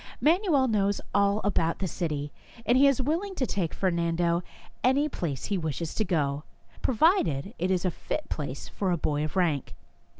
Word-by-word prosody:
Manuel 320 -4 +3
knows 205 -3 +1
all 200 +1 +3
about 170 -5 +1
the 190 - -2
city, 150 -4 -3 0.3
and 240 - +4
he 275 +2 +6
is 275 -2 +3
willing 335 +9 -1
to 265 - 0
take 180 -8 -1
Fer 190 -2 0
nando 170 0 +1 0.4
any 275 +4 +3
place 160 - -4
he 200 -2 -1
wishes 160 0 -3
to 220 - 0
go, 150 -6 0 0.4
provided 215 - +2
it 180 - 0
is 185 -1 +1
a 180 - +2
fit 300 - -4
place 140 -3 -5
for 195 - -2
a 175 - +2
boy 150 -1 0
of 155 - -4
rank. 165 -7 0
185 Hz, 180 wpm, -28 LUFS, 160-255 Hz, 0.4 s, he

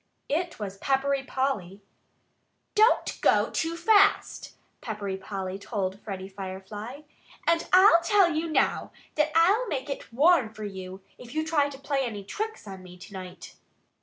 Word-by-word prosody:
It 340 +4 -1
was 195 -2 -6
Peppery 275 +2 +1
Polly. 210 -9 -3 0.9
"Don't 435 +1 +3
go - - +3
too 330 +1 -2
fast!" 405 +3 +3 0.3
Peppery 205 -4 -4
Polly 190 0 -5
told 200 -2 -3
Freddie 190 -3 -6
Firefly. 195 +6 -7 0.4
"And 335 0 +2
I'll 370 -2 +7
tell 370 0 +4
you 320 +1 -2
now - - +1 0.2
that 300 0 +1
I'll 395 +9 +4
make 280 -5 -3
it 275 - -7
warm 275 -2 +4
for 215 - -7
you 190 -1 -7 0.2
if 245 +3 -11
you 315 0 0
try 300 -3 +2
to 275 - -9
play 280 0 -2
any 220 -6 -4
tricks 435 - -5
on 190 -1 -8
me 180 -1 -13
to 185 +3 -13
night." 185 -1 -9
260 Hz, 155 wpm, -27 LUFS, -, 0.9 s, I'll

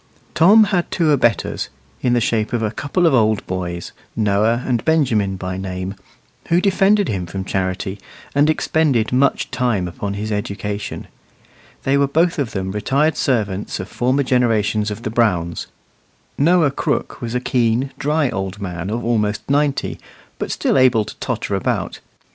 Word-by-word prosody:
Tom 200 +7 +7
had 195 -4 0
two 165 -4 +1
abettors, 120 -6 +1 0.3
in 125 - +2
the 120 - +3
shape 110 -1 0
of 115 -2 0
a 110 - 0
couple 150 +9 0
of 165 - +4
old 110 -4 +2
boys, 90 -2 -4 0.2
Noah 110 +3 +2
and 120 -3 0
Benjamin 120 -12 +2
by 95 0 -4
name, 95 0 -4 0.5
who 170 - +3
defended 195 +1 +3
him 95 -4 -2
from 95 +2 -5
Charity, 95 +1 -2 0.3
and 145 +2 +3
expended 150 -7 +1
much 135 +2 +2
time 120 -8 0
upon 100 +3 -4
his 105 +2 -4
education. 105 0 -4 0.8
They 140 +1 +2
were 140 - +3
both 165 +4 +1
of 135 -5 0
them 95 -2 -3
retired 140 +10 +1
servants 105 -7 -1
of 95 - -5
former 130 +3 +1
generations 110 -4 +1
of 105 +2 -6
the 110 - -3
Browns. 90 -8 0 0.7
Noah 160 0 +3
Crooke - - -2
was 120 0 -4
a - - +2
keen, 125 +1 +1
dry 150 -2 +1
old 95 +1 -4
man 90 -2 -4
of 115 +2 -3
almost 105 -3 0
ninety, 145 -1 0 0.4
but - - -3
still - - +1
able 125 -4 +4
to - - -9
totter - - -3
about. - - -1
115 Hz, 160 wpm, -20 LUFS, 100-140 Hz, 0.8 s, Tom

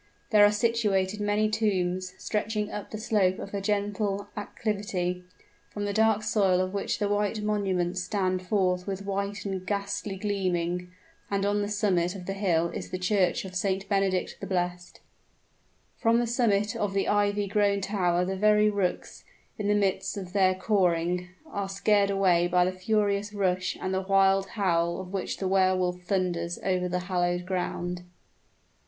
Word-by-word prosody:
There 210 -2 +7
are 205 - +7
situated 210 -3 +1
many 210 +1 +2
tombs, 185 -4 -1
stretching 210 0 -2
up 210 - -6
the 215 - -5
slope 205 -4 +1
of 200 - -8
a 200 - -2
gentle 205 0 -1
acclivity, 200 -4 -3 0.5
from 205 -1 -4
the 200 - -2
dark 220 -1 +3
soil 195 -4 +2
of 185 +1 -1
which 200 - -1
the 205 - 0
white 205 +1 0
monuments 185 -4 0
stand 185 -1 -1
forth 185 -1 0
with 195 0 -4
white 200 0 -3
and 190 -2 -3
ghastly 200 0 -3
gleaming, 180 -3 -1 0.4
and 200 0 0
on 205 +1 +1
the 205 - -2
summit 190 -4 +1
of 180 -2 -8
the 195 - -3
hill 170 -4 +1
is - - -6
the 185 - -3
church 185 -1 +1
of 185 - -8
St. 195 +1 -1
Benedict 195 -3 0
the - - -6
Blessed. 180 -1 -3 1.0
From 230 +1 +3
the 240 - +2
summit 215 -4 +1
of 200 -2 -2
the 195 - +1
ivy 205 0 +2
grown 200 0 +2
tower 180 -3 +1
the 190 +1 -2
very 210 +1 +4
rooks, 195 -3 -2 0.4
in 205 - -1
the 205 - +3
midst 200 0 0
of 185 -2 -7
their 190 -2 +3
cawing, 180 -3 +1 0.2
are 200 -1 -4
scared 200 +1 +2
away 185 -3 +3
by 180 0 +3
the 185 - 0
furious 205 +2 0
rush 185 -2 0
and 185 - -2
the 190 - 0
wild 195 0 +3
howl 170 -3 +1
with 185 -1 -7
which 190 -1 -3
the 190 - -2
Wehr 185 -1 +3
Wolf 180 -1 -1
thunders 175 -2 -1
over 180 -1 0
the 180 0 -1
hallowed 175 -1 0
ground. 180 -1 -3
195 Hz, 170 wpm, -27 LUFS, 180-205 Hz, 1.0 s, There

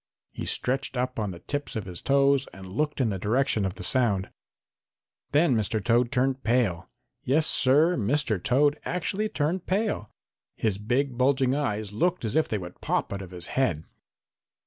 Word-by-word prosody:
He - - -6
stretched 135 +1 0
up 125 -1 -1
on 105 -2 -1
the 85 -2 -8
tips 145 +9 -4
of 110 -3 -3
his 90 -2 -7
toes 140 0 +3
and 95 0 -11
looked 150 +5 -1
in 125 -4 +2
the 95 -2 -3
direction 110 0 +1
of 95 - -3
the - - -8
sound. 100 -3 +1 1.0
Then 150 0 +4
Mr. 110 0 0
Toad 120 +3 +2
turned 130 0 0
pale. 110 -7 +1 0.3
Yes, 150 +5 +2
Sir, 150 +7 +4
Mr. 115 - 0
Toad 145 +4 +3
actually 195 +4 -2
turned 165 +3 -1
pale! 195 - -1 0.5
His 105 -3 -1
big, 125 +4 -1
bulging 130 0 +3
eyes 105 -8 -2
looked 175 +5 0
as 110 - -2
if 160 - +3
they 110 - -1
would 90 -2 -9
pop - - -1
out 100 - -4
of 95 - -8
his 90 -2 -7
head. 90 - +1
125 Hz, 175 wpm, -26 LUFS, 105-140 Hz, 1.0 s, Then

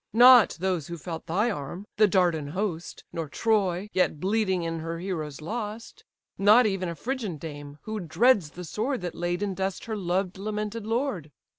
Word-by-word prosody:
Not 245 0 +8
those 180 -5 -1
who 170 - -6
felt 165 +1 -7
thy 210 +8 +1
arm, 175 +3 -6
the 215 0 +6
Dardan 175 -6 +2
host, 175 +1 -4
Nor 165 -3 -4
Troy, 200 -2 +1
yet 180 -4 +1
bleeding 190 -1 +1
in 165 0 -3
her 165 +1 -4
heroes 160 -5 -4
lost; 215 +5 -6 0.3
Not 210 +5 +6
even 195 -4 0
a 170 - -5
Phrygian 225 - -3
dame, 145 -1 -8
who 220 0 -4
dreads 200 0 +3
the 180 +5 -9
sword 230 - -2
That 175 -2 -4
laid 175 +2 -2
in 200 -2 -1
dust 190 0 -3
her 220 - -3
loved, 185 0 -1
lamented 210 +1 -4
lord." 225 - -1
190 Hz, 175 wpm, -27 LUFS, 165-215 Hz, 0.3 s, Not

